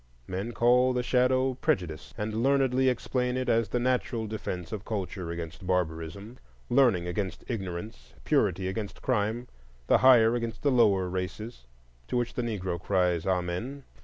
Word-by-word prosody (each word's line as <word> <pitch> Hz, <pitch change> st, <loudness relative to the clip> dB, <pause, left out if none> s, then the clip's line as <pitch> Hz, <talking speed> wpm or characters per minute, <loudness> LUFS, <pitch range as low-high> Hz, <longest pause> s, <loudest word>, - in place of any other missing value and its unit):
Men 95 Hz, -, -4 dB
call 125 Hz, +2 st, +4 dB
the 125 Hz, 0 st, 0 dB
shadow 130 Hz, +1 st, +2 dB
prejudice, 85 Hz, -, -2 dB
and 110 Hz, +1 st, -2 dB
learnedly 130 Hz, -1 st, +3 dB
explain 125 Hz, 0 st, -1 dB
it 130 Hz, -, -2 dB
as 115 Hz, -1 st, +2 dB
the -, -, -1 dB
natural 125 Hz, -2 st, 0 dB
defence 95 Hz, -5 st, -5 dB
of 105 Hz, -2 st, -5 dB
culture 95 Hz, -5 st, -4 dB
against 85 Hz, +2 st, -6 dB
barbarism, 90 Hz, +5 st, -2 dB, 0.3 s
learning 120 Hz, -9 st, +4 dB
against 95 Hz, +2 st, -3 dB
ignorance, 95 Hz, -1 st, -6 dB
purity 95 Hz, -, +1 dB
against 100 Hz, +2 st, -5 dB
crime, 120 Hz, 0 st, 0 dB, 0.4 s
the -, -, +4 dB
"higher" 120 Hz, -3 st, +6 dB
against 115 Hz, -1 st, -3 dB
the 145 Hz, -, +3 dB
"lower" 105 Hz, -7 st, +4 dB
races. 95 Hz, -, -5 dB, 0.4 s
To 125 Hz, -, -1 dB
which 120 Hz, -1 st, -1 dB
the -, -, -2 dB
Negro 95 Hz, -7 st, -3 dB
cries 90 Hz, -3 st, +1 dB
Amen! 95 Hz, +10 st, -2 dB
110 Hz, 150 wpm, -28 LUFS, 90-125 Hz, 0.4 s, higher